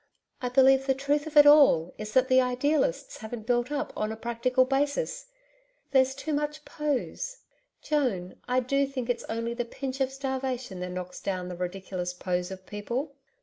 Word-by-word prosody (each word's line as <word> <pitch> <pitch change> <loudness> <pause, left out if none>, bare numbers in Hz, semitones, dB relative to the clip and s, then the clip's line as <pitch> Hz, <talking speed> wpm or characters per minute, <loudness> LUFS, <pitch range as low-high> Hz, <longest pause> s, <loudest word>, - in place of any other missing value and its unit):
I 250 - -1
believe 265 +1 +5
the 265 - +3
truth 290 +3 0
of 310 -1 -3
it 295 - +10
all 280 - +6
is 215 0 -6
that 260 0 +4
the 260 0 +5
idealists 255 - 0
haven't 220 0 -7
built 240 +2 +1
up 295 +1 -2
on 215 0 -1
a - - -4
practical 235 +3 +1
basis. 290 - -1 0.6
There's 265 -1 +4
too 310 +3 -4
much 300 +1 -2
POSE. 300 - -3 0.4
Joan, 235 -12 -1
I 250 +1 +2
do 275 +2 +1
think 255 -3 -2
it's 240 - -4
only 230 +1 -3
the 240 0 -2
pinch 265 +3 -5
of 265 0 +1
starvation 260 -6 -3
that 180 0 -4
knocks 180 0 -6
down 185 -2 -3
the 180 - -5
ridiculous 180 0 -4
POSE 180 0 -2
of 190 -1 -9
people.' 240 +8 -4
255 Hz, 180 wpm, -28 LUFS, 215-280 Hz, 0.6 s, it